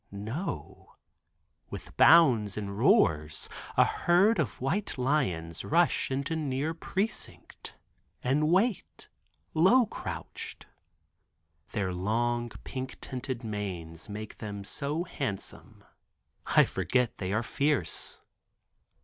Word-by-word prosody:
No; 110 - -6 0.7
with - - -8
bounds 120 - +6
and 100 -2 -4
roars 80 - +3 0.3
a - - +7
herd 190 +6 +3
of - - -1
white 165 +10 -1
lions 95 - 0
rush 170 +2 +2
into 140 +4 -1
near 150 0 -1
precinct 195 +6 -4 0.5
and 145 +5 +2
wait, 185 - 0 0.4
low 190 +10 +5
crouched. - - -7 1.1
Their 95 -5 -1
long 120 +6 0
pink 130 -1 -6
tinted 130 -1 -5
manes 95 -6 -5
make 105 +1 -7
them 100 -2 -5
so 145 - -3
handsome 135 - -5 0.6
I - - +6
forget 125 -2 0
they 95 -1 -2
are 110 +3 +1
fierce. 145 +4 -1
125 Hz, 100 wpm, -29 LUFS, 100-155 Hz, 1.1 s, a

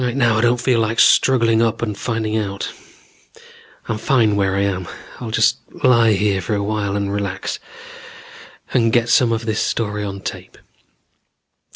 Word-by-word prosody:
Right 125 0 -1
now 120 -5 +2
I - - +2
don't 120 +1 +2
feel 120 -1 +1
like 110 0 -1
struggling 115 -4 +4
up 115 0 0
and 105 -3 -2
finding 110 0 -3
out. 100 -2 -3 1.1
I'm 110 - -3
fine 110 -4 +2
where 95 -1 0
I 100 - +1
am. 95 -3 -2 0.3
I'll 120 - -6
just 110 - +2 0.3
lie 115 -3 +5
here 100 -1 0
for 105 +4 -2
a 100 - -1
while 100 -1 -2
and 100 -1 -2
relax, 100 -1 -3 1.1
and 115 -3 +2
get 120 0 +2
some 120 0 +4
of 115 0 -2
the 110 - -1
story 105 -1 -2
on 100 -1 -6
tape. - - -8
110 Hz, 170 wpm, -19 LUFS, 100-115 Hz, 1.1 s, lie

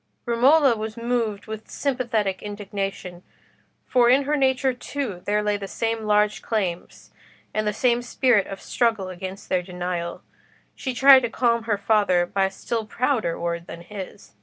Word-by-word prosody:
Romola 260 +3 +4
was 220 0 -5
moved 230 -3 -1
with 220 0 -8
sympathetic 230 -8 -1
indignation, 195 -3 -5 0.6
for 245 -2 +3
in 265 +3 +5
her 295 +2 0
nature 265 -1 +2
too 245 -7 -5
there 210 +1 +1
lay 210 0 +1
the 200 -1 -6
same 225 +1 -2
large 210 -1 +2
claims, 190 -6 -3 0.4
and 215 0 -1
the - - +2
same 240 +3 +1
spirit 245 -3 +2
of 195 - -7
struggle 225 -6 0
against 185 +2 -7
their 185 - +1
denial. 180 -1 -4 0.5
She 260 -2 -5
tried 270 +2 +8
to 240 -2 -2
calm 235 -1 +1
her 215 -3 +1
father 200 -4 +2
by 195 +2 0
a - - 0
still 220 +3 -4
prouder 235 -8 0
word 170 0 -3
than 170 - -8
his. 190 - -9
215 Hz, 160 wpm, -24 LUFS, 195-240 Hz, 0.6 s, tried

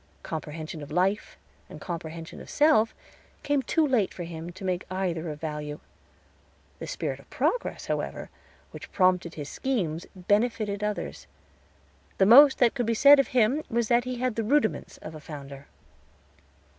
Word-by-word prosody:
Comprehension 155 0 -6
of 145 - -9
life, 185 +6 0 0.3
and - - -10
comprehension 165 -1 -7
of - - -12
self, 290 -7 +3 0.5
came 290 -1 +1
too 315 +5 +1
late 245 -9 +1
for 175 - -7
him 165 0 -7
to 190 +2 -9
make 185 -1 -1
either 175 -3 -2
of 150 -1 -6
value. 150 -1 -5 1.0
The - - -6
spirit - - -4
of - - -19
progress, - - -1
however, - - -4 0.4
which - - -10
prompted 180 -3 +2
his 145 -2 -6
schemes 180 - -2
benefited 205 +2 0
others. 210 0 -4 0.9
The 190 - +4
most 270 +6 +8
that 245 -2 +4
could 245 -4 -2
be 230 - +1
said 280 +4 +8
of 275 - +3
him 250 +4 +2
was 235 -1 0
that 240 +1 +3
he 255 0 -4
had 250 -2 -2
the 225 - 0
rudiments 255 0 0
of 155 - -7
a 155 - -9
Founder. 140 -2 -10
195 Hz, 160 wpm, -27 LUFS, 160-245 Hz, 1.0 s, most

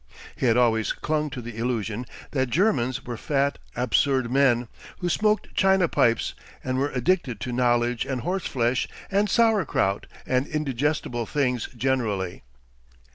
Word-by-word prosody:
He 130 - 0
had 115 0 +4
always 115 -3 +2
clung 150 0 -1
to 125 -3 -7
the 115 -1 -8
illusion 115 -1 -2 0.2
that 130 -2 0
Germans 130 - +1
were 120 -2 -5
fat, 140 +3 0 0.2
absurd 125 +1 +1
men, 125 -3 +3 0.3
who 180 - -2
smoked 210 +4 +1
china 190 -2 +4
pipes, 115 -6 +2 0.3
and 130 0 -1
were 140 +2 +1
addicted 130 - 0
to 125 - -3
knowledge 120 -1 +1
and 130 -3 -3
horseflesh 130 -8 0 0.2
and 200 +1 +2
sauerkraut 200 - +2 0.2
and 130 +2 +1
indigestible 140 -5 -1
things 125 -5 0
generally. 110 -8 -1
130 Hz, 135 wpm, -25 LUFS, 120-150 Hz, 0.3 s, had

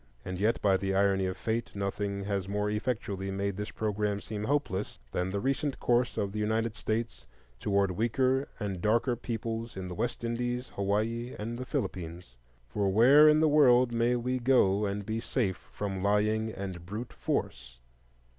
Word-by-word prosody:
And 90 0 -4
yet, 110 +3 +2
by 95 -2 +4
the 95 0 -1
irony 95 -1 +3
of 95 - -4
fate, 115 0 -2
nothing 100 0 -2
has 100 -1 -2
more 105 +1 -1
effectually 105 -4 -2
made 100 0 -2
this 105 +2 -4
programme 105 -1 -1
seem 105 0 -5
hopeless 120 -8 -1
than 90 +5 -1
the 100 +1 -2
recent 135 +3 -1
course 120 0 +1
of 100 -1 -1
the 105 - -4
United 110 +1 0
States 110 - -3 0.3
toward 100 -2 +1
weaker 130 +7 +1
and 100 -5 -3
darker 115 +4 +2
peoples 115 -1 -4
in 95 -1 -4
the - - -5
West 120 +6 -3
Indies, 120 +2 -2
Hawaii, 110 +5 -1
and 115 +3 -4
the 130 - -5
Philippines,—for 80 - -4
where 135 +9 +7
in 150 +1 +4
the 160 - +5
world 130 -5 +5
may 120 +1 +2
we 125 +1 -1
go 105 -5 +3
and 100 0 -3
be 110 +2 -2
safe 110 -5 -2
from 95 -2 -3
lying 105 +2 +1
and 95 -4 -6
brute 105 +7 -6
force? 65 -1 -3
105 Hz, 170 wpm, -30 LUFS, 100-120 Hz, 0.3 s, where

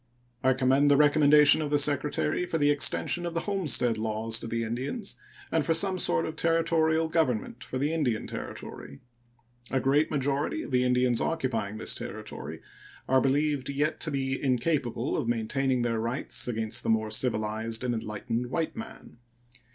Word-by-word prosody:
I 130 0 +4
commend 130 +3 +3
the 140 - +5
recommendation 150 +1 +6
of 150 - -2
the 145 - +3
Secretary 150 +4 +1
for 165 - -1
the 145 -1 +3
extension 145 +4 +2
of 170 -1 -4
the 165 - 0
homestead 150 - +1
laws 110 +1 -1
to - - -7
the 115 0 -2
Indians 130 - -4 0.4
and 160 -2 +2
for 165 +3 +2
some 185 +2 +2
sort 85 - +1
of 160 - -5
Territorial 165 -1 +2
government 125 -7 -1
for 130 - -5
the 145 +4 0
Indian 130 -9 -1
Territory. 70 0 -8 0.7
A 135 - 0
great 140 +4 +2
majority 140 0 -1
of - - -9
the 125 0 +2
Indians 125 -1 +2
occupying 125 -10 -2
this 110 - 0
Territory - - -7 0.5
are 130 0 +4
believed 145 0 0
yet 145 +3 -1
to 160 - 0
be 135 -2 -2
incapable 130 -1 0
of - - -2
maintaining 125 +2 0
their 115 -2 0
rights 120 +4 -2
against 110 -2 -1
the - - -3
more 110 -1 +1
civilized 110 0 -2
and 125 -1 0
enlightened 115 +2 -3
white 160 +5 -2
man. 225 - -10
135 Hz, 165 wpm, -28 LUFS, 115-150 Hz, 0.7 s, recommendation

